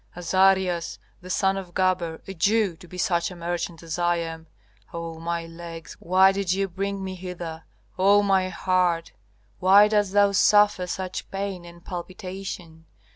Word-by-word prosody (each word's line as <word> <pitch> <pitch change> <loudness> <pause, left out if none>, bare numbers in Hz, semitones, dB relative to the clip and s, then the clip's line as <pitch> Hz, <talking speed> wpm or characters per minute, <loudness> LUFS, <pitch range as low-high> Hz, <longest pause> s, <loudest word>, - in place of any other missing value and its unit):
Azarias, 185 -1 +2 0.2
the 180 - -11
son 195 +1 +1
of 185 -3 -8
Gaber, 180 -3 0
a 195 - -5
Jew, 200 +1 +2
to 180 +1 -14
be 180 - -10
such 175 -3 +1
a 180 - -10
merchant 170 -1 -4
as 165 +1 -5
I 175 0 +2
am. 165 -1 -5 0.4
Oh, 165 -1 -6
my 170 0 -3
legs, 165 0 -9
why 190 +2 +5
did 195 -2 -1
ye 195 +1 +1
bring 195 +1 -4
me 190 0 -4
hither? 175 -3 -7 0.3
Oh, 200 +2 +5
my 190 -2 +2
heart, 180 -2 0 0.5
why 195 +3 +7
dost 205 -2 +1
thou 205 0 +5
suffer 205 -2 +4
such 185 0 -5
pain 195 -2 -4
and 170 0 -14
palpitation? 180 -2 -7
180 Hz, 160 wpm, -25 LUFS, 170-195 Hz, 0.5 s, why